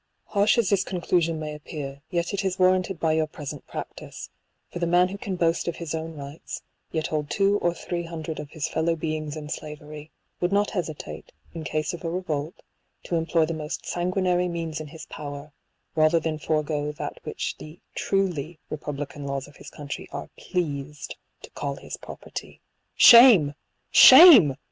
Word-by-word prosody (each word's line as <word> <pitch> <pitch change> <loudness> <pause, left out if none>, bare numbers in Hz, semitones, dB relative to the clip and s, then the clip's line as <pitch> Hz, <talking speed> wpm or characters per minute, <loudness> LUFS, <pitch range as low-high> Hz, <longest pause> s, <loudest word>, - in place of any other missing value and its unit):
Harsh 205 +3 +3
as 225 -4 +2
this 195 -1 +3
conclusion 170 -3 0
may 155 -1 -5
appear, 145 -2 -7
yet 175 +1 -1
it 200 0 -1
is 190 -1 -1
warranted 185 -1 +2
by 160 -1 +2
your 160 0 +1
present 150 -2 -8
practice; - - -8 0.4
for 175 - -5
the 170 - 0
man 175 +1 +4
who 200 - -6
can 195 -2 -4
boast 170 -1 0
of 170 - -2
his 165 -3 -5
own 160 0 -4
rights, 140 +2 -8 0.3
yet 160 -1 -1
hold 150 -1 -2
two 200 +3 +2
or 175 - +1
three 170 0 -4
hundred 165 -2 -6
of 145 - -7
his 155 -1 -3
fellow 165 +1 0
beings 155 -1 -4
in 150 -1 -7
slavery, 150 0 -8 0.3
would 175 +1 0
not 205 +1 +2
hesitate, 165 -6 -5 0.2
in 165 -2 -6
case 155 +1 -2
of 175 - -8
a 165 - -2
revolt, 165 -3 -4 0.4
to 175 - -3
employ 165 0 +2
the 165 - -3
most 155 -1 -5
sanguinary 180 0 0
means 165 -2 -4
in 155 - -7
his 160 +2 -10
power, 145 0 -8 0.4
rather 155 +1 +4
than 155 -1 -3
forego 150 -1 -1
that 150 - -6
which - - -4
the 155 +3 -11
truly 175 -5 -1
republican 145 -1 -5
laws 140 -1 -3
of 145 - -17
his - - -11
country 145 -1 -7
are - - -7
pleased 150 -4 -4 0.3
to - - -11
call - - -4
his - - -8
property. - - -9 0.4
Shame! 235 - +8 0.4
Shame 260 - +10
160 Hz, 175 wpm, -25 LUFS, 150-180 Hz, 0.4 s, Shame